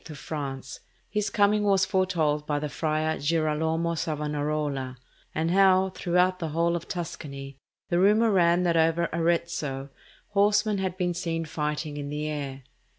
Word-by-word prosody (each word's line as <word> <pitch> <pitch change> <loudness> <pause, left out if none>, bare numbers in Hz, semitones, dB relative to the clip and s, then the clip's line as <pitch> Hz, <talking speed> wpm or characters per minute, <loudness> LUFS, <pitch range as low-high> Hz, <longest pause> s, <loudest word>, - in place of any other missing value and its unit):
of 150 - -8
France, 135 -2 -5 0.3
his 210 -1 0
coming 205 +1 +3
was 195 -2 +3
foretold 170 -6 0
by 145 - 0
the 150 +1 -2
friar 155 +1 -1
Girolamo 160 +2 0
Savonarola; 150 -4 -2 0.4
and 165 +1 0
how, 190 0 +4
throughout 180 +1 +1
the 165 - -2
whole 170 +2 +1
of 170 - -5
Tuscany, 140 -6 -6 0.3
the 175 - +2
rumour 215 +4 +4
ran 175 -2 +4
that 170 -1 +2
over 165 +1 +2
Arezzo 165 -5 -1 0.4
horsemen 210 0 +2
had 185 -1 -2
been 180 -2 0
seen 165 -1 -2
fighting 150 0 -3
in 145 -1 -4
the 150 +1 -3
air. 140 -3 -4
165 Hz, 150 wpm, -27 LUFS, 150-180 Hz, 0.4 s, how